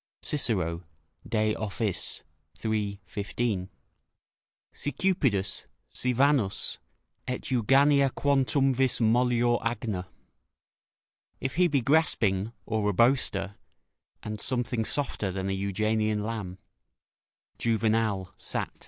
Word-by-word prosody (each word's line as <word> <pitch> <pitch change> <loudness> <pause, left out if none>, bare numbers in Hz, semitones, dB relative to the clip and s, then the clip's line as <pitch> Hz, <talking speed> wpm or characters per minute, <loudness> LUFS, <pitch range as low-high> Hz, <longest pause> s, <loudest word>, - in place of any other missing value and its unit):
Cicero, 90 - +1 0.5
De 110 -1 +1
Offic., 105 -2 -2 0.4
iii. 105 -2 -1
15.] 100 0 -2 1.0
"Si 145 - -2
cupidus, 125 - 0 0.2
si 125 - 0
Vanus, 130 -5 +2 0.5
et 125 - -3
Euganea 135 +3 +4
quantumvis 135 -1 +2
mollior 120 +1 +3
agna." 110 -5 -2 1.3
["If 130 0 -3
he 180 0 +5
be 145 -5 +1
grasping, 115 -8 +2
or 110 -2 0
a - - 0
boaster, 100 -4 +2 0.7
and 105 -1 -5
something 120 -2 0
softer 115 -9 -1
than 95 +1 -3
an - - 0
Euganean 105 +2 0
lamb." 105 -5 -4 1.0
Juvenal, 110 -4 +1
Sat. - - -2
110 Hz, 95 wpm, -28 LUFS, 100-130 Hz, 1.3 s, he